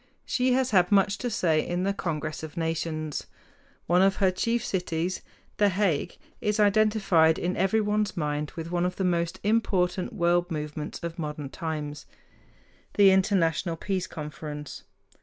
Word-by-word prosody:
She 250 0 +1
has 260 0 +1
had 180 -2 +4
much 200 0 +3
to 245 - -2
say 165 -8 +1
in 175 +1 -2
the 200 +1 +1
Congress 155 -5 -3
of 160 0 -8
Nations. 160 -2 -2 0.6
One 175 +2 +3
of 195 0 +4
her 190 -1 +3
chief 230 +5 -1
cities, 180 -1 -2 0.4
The 205 -1 +4
Hague, 185 -6 0 0.2
is 210 +1 0
identified 200 -6 +4
in 180 +1 -1
everyone's 210 0 +1
mind 150 -2 -2
with 165 0 -6
one 175 0 +1
of 180 - -5
the 195 - -2
most 170 0 0
important 190 -4 +1
world 175 -2 +2
movements 150 -2 -5
of 170 +1 -5
modern 150 -3 -4
times, 150 -2 -5 0.9
the 200 -2 +7
International 185 -3 +2
Peace 185 +2 -2
Conference. 150 -1 -7
180 Hz, 150 wpm, -27 LUFS, 160-200 Hz, 0.9 s, the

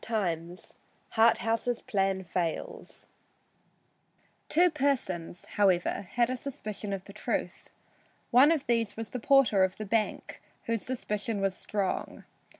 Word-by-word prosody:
III 175 -5 -1 0.5
HARTHOUSE'S 230 +1 +2
PLAN 195 -2 0
FAILS 180 - -4 1.4
Two 350 +3 +4
persons, 245 - -1
however, 190 -1 +1
had 240 0 +2
a - - -1
suspicion 215 -6 -6
of 195 -2 -3
the 200 - -12
truth. 210 - -3 0.6
One 265 +6 +7
of 305 -4 0
these 230 -3 0
was 225 -1 -6
the 250 - -3
porter 235 -6 +4
of 190 0 0
the 215 - -5
bank, 215 +1 -1 0.2
whose 230 -2 -1
suspicion 215 -4 -3
was 195 -1 0
strong. 200 -1 -3
215 Hz, 125 wpm, -29 LUFS, 195-245 Hz, 1.4 s, One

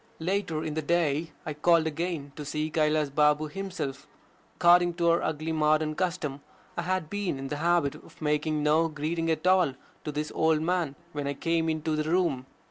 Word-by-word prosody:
Later 165 -2 -1
in 155 - -3
the 160 - -1
day 160 -1 +1
I 155 - -3
called 165 +2 +3
again 160 -2 -3
to 150 - -6
see 155 +2 -3
Kailas 150 -2 +1
Balm 150 +1 +3
himself. 160 -8 -5 0.5
According 175 0 +5
to 170 -1 +3
our 170 - +2
ugly 155 +1 -2
modern 155 0 +2
custom, 160 -5 -2 0.3
I - - -1
had 185 -1 -1
been 200 -4 -2
in 135 0 -6
the 150 - -3
habit 170 -3 +2
of 165 +1 -15
making 150 0 0
no 155 +2 +3
greeting 165 +2 -2
at 160 +1 -1
all 185 -7 +4 0.3
to 150 - -3
this 150 +1 -3
old 160 -1 +3
man 170 -4 0 0.2
when 145 -1 -3
I 140 - -2
came 165 +1 0
into 155 0 -1
the 155 0 -1
room. 160 -7 +1
155 Hz, 190 wpm, -28 LUFS, 150-170 Hz, 0.5 s, According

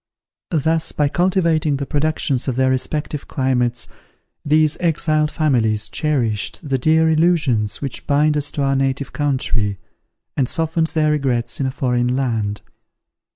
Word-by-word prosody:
Thus, 160 0 0
by 145 -1 +1
cultivating 170 -4 +1
the 140 - -3
productions 145 -3 -1
of 130 - -1
their 130 0 +2
respective 150 +3 -3
climates, 125 -3 0 0.6
these 155 +1 +3
exiled 155 -2 +1
families 115 -9 +1
cherished 130 - -2
the 135 -2 0
dear 160 +4 +3
illusions 155 - +1
which 135 - -5
bind 150 +1 +3
us 145 -1 0
to 145 - -1
our 135 0 +1
native 135 0 -1
country, 125 -8 0 0.6
and 130 -3 0
softened 160 0 0
their 155 -1 +1
regrets 130 -5 -1
in 135 - 0
a - - -2
foreign 125 -1 0
land. 115 -6 -1
140 Hz, 140 wpm, -20 LUFS, 125-155 Hz, 0.6 s, these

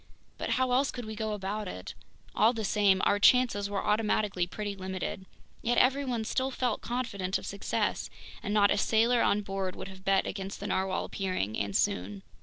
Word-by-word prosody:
But - - -3
how 260 -1 +1
else 270 +3 +3
could 245 -2 -5
we 220 - -6
go 220 0 -2
about 205 +1 -3
it? 90 - -7 0.4
All 220 +3 +4
the 225 -2 -3
same, 200 -2 +3
our 205 - +3
chances 205 -3 +4
were 200 -1 -2
automatically 210 -4 +1
pretty 205 +2 -4
limited. 190 0 -5 0.3
Yet 240 +1 +1
everyone 255 -3 +2
still 260 +4 0
felt 250 -4 -1
confident 200 -6 -2
of - - -9
success, 200 0 -2 0.3
and 205 - -4
not 205 -1 +4
a - - +2
sailor 230 +3 +3
on 210 - +3
board 195 -2 -3
would - - -7
have 190 0 -12
bet 195 0 +3
against 195 0 -5
the 200 - -6
narwhale 190 -1 0
appearing, 185 - -2
and 100 -1 -2
soon. 95 +2 0
205 Hz, 190 wpm, -29 LUFS, 190-230 Hz, 0.4 s, All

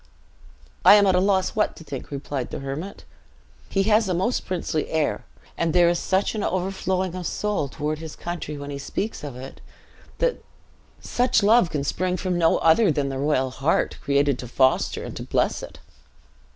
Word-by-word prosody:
"I 195 +3 +9
am 205 -1 +5
at 190 - +4
a 180 - +4
loss 190 0 +2
what 215 - +1
to - - -12
think," 135 -4 -7
replied 140 -2 -4
the - - -5
hermit; 140 +8 -6 0.6
"he 195 - +1
has 215 0 +3
a 180 - +1
most 190 +8 -1
princely 165 -4 -2
air; 155 -2 -1 0.3
and 165 -1 0
there 175 -1 +5
is 175 - 0
such 190 +1 0
an 215 - -3
overflowing 185 -1 -1
of 180 -2 -4
soul 210 -8 -1
toward 150 +2 -3
his 160 -1 -8
country, 170 -4 -5
when 145 0 -7
he 140 - -5
speaks 205 +8 -4
of 145 -4 -6
it, 130 +2 -10 0.6
that - - 0 0.6
Such 245 -3 +1
love 215 -3 +5
can 145 -3 -2
spring 180 +5 -1
from 185 0 -2
no 165 -1 +3
other 165 +4 +4
than 145 -2 -1
the 135 -1 -4
royal 135 -2 +1
heart, 135 +5 0
created 140 -1 +1
to 125 - -6
foster 130 +2 +1
and - - -7
to - - -6
bless - - 0
it." - - -9
170 Hz, 190 wpm, -24 LUFS, 145-190 Hz, 0.6 s, I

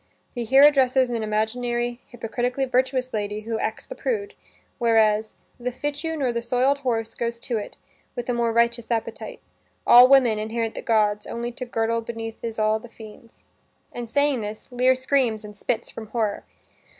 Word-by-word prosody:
He 240 -2 -4
here 270 +5 +6
addresses 265 -3 +4
an 230 -2 -1
imaginary 240 +3 -1
hypocritically 245 +3 -2
virtuous 255 0 0
lady 210 0 -2
who 225 0 -3
acts 220 - -3
the - - -7
prude, 435 -5 -3 0.5
whereas 220 -2 +2 0.2
"The 250 +1 -2
fitchew 290 +5 -3
nor 265 -4 0
the 235 - -1
soiled 255 +4 +1
horse 225 -4 -2
goes 235 0 -3
to't 225 -4 -4 0.4
With 245 -1 -4
a 250 - 0
more 235 -1 +1
riotous 235 0 +1
appetite. 230 -2 -4 0.4
All 245 +1 +9
women 250 -6 +5
inherit 225 +1 -2
the - - -6
gods 210 -2 +1
only 235 +1 -4
to 255 +1 -7
the - - -20
girdle 230 +1 0
Beneath 225 0 -7
is 230 -1 -4
all 215 0 +2
the 240 - -12
fiend's" 225 0 -14 0.5
and, 240 -1 -6
saying 285 -1 +1
this, 210 +4 -7
Lear 250 +1 +3
screams 255 -5 0
and 210 0 -10
spits 225 +3 -3
from 220 - -8
horror. 215 -2 -2
235 Hz, 175 wpm, -24 LUFS, 220-255 Hz, 0.5 s, All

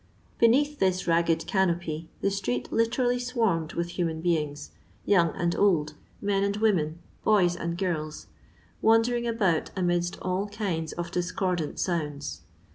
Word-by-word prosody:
Beneath 285 +6 +4
this 185 -1 +2
ra^ed 165 -1 +2
canopy, 170 -4 0
the 200 - +1
street 125 -11 -2
literally 245 +2 +1
swarmed 225 -10 0
vrith 170 0 -2
human 165 -2 -2
beings 150 -4 -1 0.2
— - - -32
young 175 -5 +4
and 175 0 0
old, 160 -7 +2 0.3
men 200 -1 +1
and 200 0 0
women, 175 -8 +1 0.3
boys 185 -5 +4
and 170 0 -3
girls, 155 -5 -3 0.6
vrandering 235 +2 +3
about 195 -8 +1
amidst 175 -1 0
all 185 +3 -2
kinds 185 -7 -2
of 170 0 -5
discordant 180 -3 -1
sounds. 150 - -2
180 Hz, 135 wpm, -27 LUFS, 165-205 Hz, 0.6 s, Beneath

